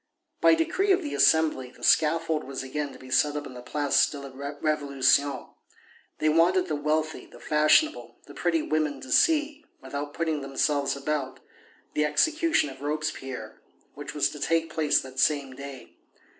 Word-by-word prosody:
By -, -, +6 dB
decree 370 Hz, +5 st, +1 dB
of 370 Hz, -1 st, +3 dB
the 295 Hz, -, -5 dB
Assembly 140 Hz, -2 st, +3 dB
the -, -, -18 dB
scaffold 160 Hz, 0 st, +2 dB
was 135 Hz, 0 st, -6 dB
again 145 Hz, +2 st, -4 dB
to -, -, -12 dB
be 130 Hz, 0 st, -13 dB
set 145 Hz, +3 st, +2 dB
up 150 Hz, 0 st, -4 dB
in -, -, -9 dB
the 125 Hz, -, -9 dB
Place 145 Hz, +3 st, +1 dB
de 145 Hz, -, -7 dB
la 140 Hz, -1 st, -9 dB
Révolution. 140 Hz, 0 st, 0 dB, 0.6 s
They 155 Hz, -, 0 dB
wanted 170 Hz, +4 st, +3 dB
the 155 Hz, -, -1 dB
wealthy, 155 Hz, +2 st, -2 dB
the -, -, -16 dB
fashionable, 155 Hz, -, +2 dB
the -, -, -13 dB
pretty 325 Hz, -1 st, 0 dB
women 155 Hz, -, -1 dB
to 130 Hz, -, -9 dB
see, 300 Hz, -, +2 dB, 0.2 s
without 140 Hz, +2 st, -6 dB
putting 160 Hz, -3 st, -1 dB
themselves 140 Hz, +1 st, 0 dB
about, 140 Hz, -1 st, -3 dB, 0.5 s
the 150 Hz, -, +1 dB
execution 305 Hz, -, +1 dB
of 135 Hz, 0 st, -13 dB
Robespierre, 150 Hz, -3 st, -4 dB, 0.3 s
which -, -, -8 dB
was -, -, +2 dB
to -, -, -9 dB
take 165 Hz, -1 st, 0 dB
place 155 Hz, -2 st, +2 dB
that 130 Hz, 0 st, -9 dB
same 140 Hz, -4 st, +1 dB
day. 140 Hz, -1 st, -10 dB
150 Hz, 170 wpm, -26 LUFS, 140-160 Hz, 0.6 s, By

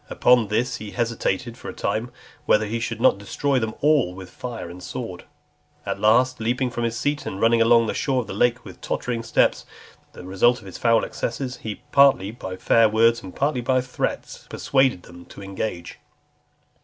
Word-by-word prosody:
Upon 125 Hz, -3 st, +3 dB
this, 120 Hz, +5 st, -1 dB
he 105 Hz, -, -8 dB
hesitated 115 Hz, 0 st, -2 dB
for -, -, -7 dB
a -, -, -7 dB
time, 110 Hz, +4 st, -2 dB, 0.4 s
whether 110 Hz, 0 st, +4 dB
he 115 Hz, +3 st, -3 dB
should 115 Hz, 0 st, -4 dB
not 100 Hz, -, +4 dB
destroy 135 Hz, +7 st, -1 dB
them 110 Hz, -2 st, -3 dB
all 145 Hz, -11 st, +2 dB
with 95 Hz, -1 st, -10 dB
fire 120 Hz, -7 st, -7 dB
and 90 Hz, +2 st, -10 dB
sword. -, -, -7 dB, 0.6 s
At -, -, -3 dB
last, 125 Hz, +4 st, +3 dB
leaping 125 Hz, +3 st, -1 dB
from 120 Hz, 0 st, -2 dB
his 115 Hz, 0 st, -2 dB
seat, 145 Hz, +3 st, -2 dB
and 95 Hz, -, -5 dB
running 115 Hz, +1 st, +3 dB
along 115 Hz, 0 st, +5 dB
the -, -, -2 dB
shore 130 Hz, -3 st, 0 dB
of -, -, -8 dB
the -, -, -7 dB
lake 120 Hz, +4 st, +1 dB
with -, -, -12 dB
tottering 120 Hz, -2 st, -3 dB
steps, 115 Hz, -, +1 dB, 0.5 s
the -, -, -11 dB
result 95 Hz, +6 st, +3 dB
of -, -, -16 dB
his 95 Hz, -, -9 dB
foul 115 Hz, -1 st, +3 dB
excesses, 125 Hz, +2 st, -4 dB
he, 110 Hz, -2 st, -7 dB
partly 140 Hz, -8 st, +4 dB
by 95 Hz, -5 st, -7 dB
fair 115 Hz, +4 st, +3 dB
words, 115 Hz, +2 st, +3 dB
and 95 Hz, -1 st, -10 dB
partly 140 Hz, -2 st, 0 dB
by 130 Hz, +2 st, +2 dB
threats, 125 Hz, 0 st, -4 dB
persuaded 130 Hz, -9 st, +1 dB
them 85 Hz, 0 st, -13 dB
to 100 Hz, -, -12 dB
engage. 95 Hz, -3 st, -5 dB
115 Hz, 190 wpm, -23 LUFS, 105-125 Hz, 0.6 s, along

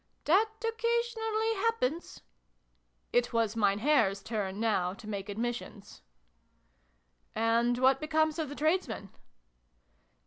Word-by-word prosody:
" -, -, -43 dB
That 400 Hz, +8 st, +4 dB, 0.2 s
occasionally 455 Hz, -1 st, 0 dB
happens." 385 Hz, -, -1 dB, 0.9 s
It 245 Hz, 0 st, +2 dB
was 230 Hz, -2 st, +1 dB
Mein 200 Hz, -3 st, +2 dB
Herr's 215 Hz, -6 st, +2 dB
turn, 205 Hz, -3 st, -3 dB
now, 195 Hz, -5 st, 0 dB
to 215 Hz, 0 st, -12 dB
make 200 Hz, -1 st, -5 dB
admissions. 225 Hz, -1 st, -5 dB, 0.7 s
" -, -, -42 dB, 0.6 s
And 230 Hz, +2 st, +2 dB
what 260 Hz, +1 st, +4 dB
becomes 315 Hz, +1 st, +1 dB
of 310 Hz, -3 st, -2 dB
the 290 Hz, -, -7 dB
tradesmen 300 Hz, -, -1 dB
245 Hz, 115 wpm, -30 LUFS, 210-335 Hz, 0.9 s, That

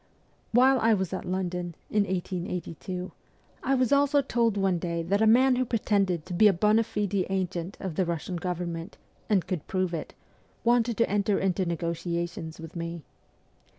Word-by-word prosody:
While 255 Hz, +3 st, +5 dB
I 225 Hz, -1 st, +4 dB
was 190 Hz, -2 st, -2 dB
at 185 Hz, -, -4 dB
London, 180 Hz, -2 st, -3 dB, 0.2 s
in 210 Hz, -1 st, +3 dB
1882, 180 Hz, -1 st, -4 dB, 0.5 s
1 270 Hz, 0 st, +1 dB
was 255 Hz, +1 st, +2 dB
also 285 Hz, 0 st, +4 dB
told 235 Hz, -5 st, +1 dB
one 190 Hz, -3 st, +1 dB
day 170 Hz, -1 st, -2 dB
that 200 Hz, +5 st, +1 dB
a 220 Hz, -, +5 dB
man 250 Hz, +3 st, +5 dB
who 255 Hz, -, +2 dB
pretended 200 Hz, -8 st, 0 dB
to 185 Hz, -, -6 dB
be 210 Hz, +5 st, +6 dB
a 200 Hz, -, +5 dB
bond 210 Hz, +5 st, +3 dB
fide 205 Hz, -2 st, -2 dB, 0.2 s
agent 185 Hz, -1 st, -2 dB
of 190 Hz, -4 st, -4 dB
the 185 Hz, -, +1 dB
Russian 170 Hz, +1 st, -3 dB
government, 170 Hz, +1 st, -4 dB, 0.3 s
and 200 Hz, -5 st, +2 dB
could 180 Hz, -4 st, -4 dB
prove 185 Hz, -2 st, -1 dB
it, 160 Hz, -, -5 dB, 0.5 s
wanted 235 Hz, -1 st, +2 dB
to 230 Hz, -, +3 dB
enter 200 Hz, 0 st, +1 dB
into 190 Hz, -1 st, 0 dB
negotiations 170 Hz, 0 st, -3 dB
with 165 Hz, +1 st, -9 dB
me. 170 Hz, -1 st, -5 dB
185 Hz, 170 wpm, -27 LUFS, 170-215 Hz, 0.5 s, be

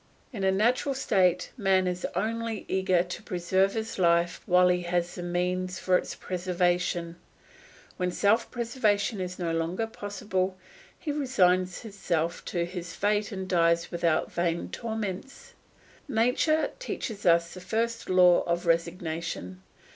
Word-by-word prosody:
In 200 Hz, -4 st, -4 dB
a 190 Hz, -, +4 dB
natural 245 Hz, +7 st, +1 dB
state 185 Hz, -8 st, +2 dB
man 190 Hz, -4 st, +3 dB
is 180 Hz, 0 st, -2 dB
only 230 Hz, 0 st, -2 dB
eager 185 Hz, -2 st, +2 dB
to 180 Hz, +3 st, -7 dB
preserve 190 Hz, -1 st, +1 dB
his 220 Hz, -2 st, -4 dB
life 170 Hz, -1 st, +2 dB
while 180 Hz, 0 st, +5 dB
he 180 Hz, 0 st, +2 dB
has 175 Hz, 0 st, -1 dB
the -, -, -6 dB
means 180 Hz, +1 st, -1 dB
for 185 Hz, 0 st, +2 dB
its -, -, -1 dB
preservation; 175 Hz, -1 st, -1 dB, 0.8 s
when 180 Hz, 0 st, 0 dB
self 210 Hz, +5 st, +2 dB
preservation 230 Hz, -4 st, 0 dB
is 180 Hz, 0 st, -4 dB
no 170 Hz, -2 st, -2 dB
longer 165 Hz, +6 st, -1 dB
possible, 200 Hz, -3 st, -3 dB, 0.4 s
he 305 Hz, -, -4 dB
resigns 185 Hz, -11 st, +2 dB
himself 175 Hz, -6 st, -2 dB
to 170 Hz, -1 st, -1 dB
his 175 Hz, -1 st, -7 dB
fate 205 Hz, +2 st, 0 dB
and 190 Hz, -2 st, -5 dB
dies 170 Hz, -2 st, +2 dB
without 170 Hz, -2 st, +1 dB
vain 170 Hz, -1 st, -1 dB
torments. 225 Hz, -, -5 dB, 0.5 s
Nature 260 Hz, +6 st, +2 dB
teaches 220 Hz, -, -4 dB
us 170 Hz, 0 st, +4 dB
the 185 Hz, -, -9 dB
first 230 Hz, +5 st, -2 dB
law 180 Hz, -1 st, +6 dB
of 170 Hz, +1 st, 0 dB
resignation. 165 Hz, -, -2 dB
185 Hz, 140 wpm, -28 LUFS, 175-215 Hz, 0.8 s, law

